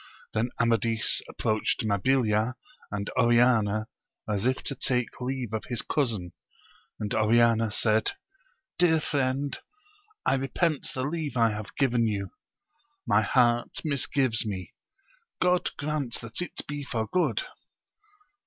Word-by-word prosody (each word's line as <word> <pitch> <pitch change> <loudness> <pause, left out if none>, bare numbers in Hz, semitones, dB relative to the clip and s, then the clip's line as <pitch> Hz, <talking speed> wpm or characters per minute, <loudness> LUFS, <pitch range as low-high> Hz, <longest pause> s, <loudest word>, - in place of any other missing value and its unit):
Then 110 +3 0
Amadis 115 -1 +2
approached 110 0 0
Mabilia 110 +2 +2 0.3
and 100 0 -3
Oriana, 120 -3 +3 0.4
as 105 +1 0
if 130 0 0
to - - -3
take 125 -1 -1
leave 125 -3 -3
of 110 - -2
his 120 -3 -2
cousin, 110 - -1 0.7
and 105 - -3
Oriana 115 +1 +4
said, 110 0 +1 0.7
dear 165 -2 +5
friend, 140 -1 -1 0.7
I - - +3
repent 135 +4 0
the 130 - -1
leave 150 -2 -3
I 115 -1 +4
have 105 0 -6
given 120 -4 +2
you; 100 -3 -2 0.7
my 105 -2 +4
heart 120 0 +2
misgives 135 -5 +1
me: 95 -5 -5 0.7
God 180 0 +2
grant 145 -5 -2
that 115 +7 -4
it 175 - -4
be 145 0 -4
for 115 -5 -2
good 185 - +1
120 Hz, 125 wpm, -27 LUFS, 110-135 Hz, 0.7 s, dear